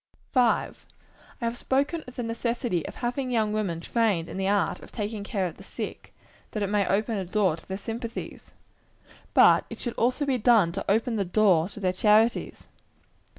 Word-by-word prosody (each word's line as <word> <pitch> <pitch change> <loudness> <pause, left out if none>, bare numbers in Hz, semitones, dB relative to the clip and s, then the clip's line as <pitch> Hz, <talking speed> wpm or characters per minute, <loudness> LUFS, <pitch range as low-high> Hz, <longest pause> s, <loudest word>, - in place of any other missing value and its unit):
5. 245 -3 +1 0.6
I - - -1
have 230 +1 -1
spoken 285 +5 0
of 250 - -11
the 245 - -3
necessity 230 - -1
of - - -8
having 255 +2 -2
young 220 -3 +1
women 195 -6 -1
trained 210 -6 +1
to - - -7
the 190 0 -1
art 200 -1 +1
of - - -13
taking 210 -1 -4
care 200 -2 -1
of 170 - -5
the - - -12
sick, - - -7 0.4
that 215 - -1
it 200 - -2
may 205 -2 +2
open 215 +3 0
a - - -2
door 185 -2 +1
to 160 - -16
their 190 - -4
sympathies. 230 +2 -6 0.9
But - - +6
it - - -7
should 240 - -4
also 255 +5 +1
be 265 -3 0
done 215 -7 +4
to 195 +3 -4
open 225 +2 +1
the 200 - +1
door 185 -3 +3
to 205 - -10
their 185 -2 0
charities. 215 +4 +2
215 Hz, 195 wpm, -26 LUFS, 195-235 Hz, 0.9 s, But